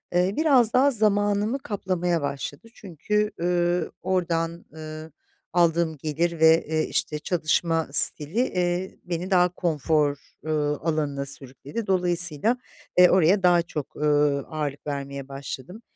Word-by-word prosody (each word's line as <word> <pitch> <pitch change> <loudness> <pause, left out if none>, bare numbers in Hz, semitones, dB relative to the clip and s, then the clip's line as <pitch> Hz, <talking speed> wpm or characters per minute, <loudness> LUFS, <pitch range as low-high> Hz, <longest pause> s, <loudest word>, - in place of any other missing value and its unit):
eee, 180 +2 +2
biraz 265 -8 +4
daha 275 +3 +4
zamanımı 205 +2 +1
kaplamaya 185 - -2
başladı. 140 +6 -5
Çünkü, 210 - -2
eee, 175 0 0
ordan, 170 -2 -1
ııı, 155 0 -8 0.4
aldığım 170 -2 +2
gelir 160 +3 -2
ve, 160 +1 +5
eee, 155 0 0
işte 150 -1 -1
çalışma 165 0 0
stili, 155 +9 +2
eee, 180 -4 -1
beni 175 +2 -4
daha 180 -1 +4
konfor, 155 -4 0 0.3
ııı, 150 -2 0
alanına 150 -4 -2
sürükledi. 140 - -7
Dolayısıyla, 180 - +2 0.4
eee, 180 0 +8
oraya 185 +2 +3
daha 175 -1 +5
çok, 150 -4 -7
ııı, 145 -2 +1
ağırlık 150 -2 -4
vermeye 140 -1 -5
başladım. 140 - -8
170 Hz, 125 wpm, -25 LUFS, 150-185 Hz, 0.4 s, eee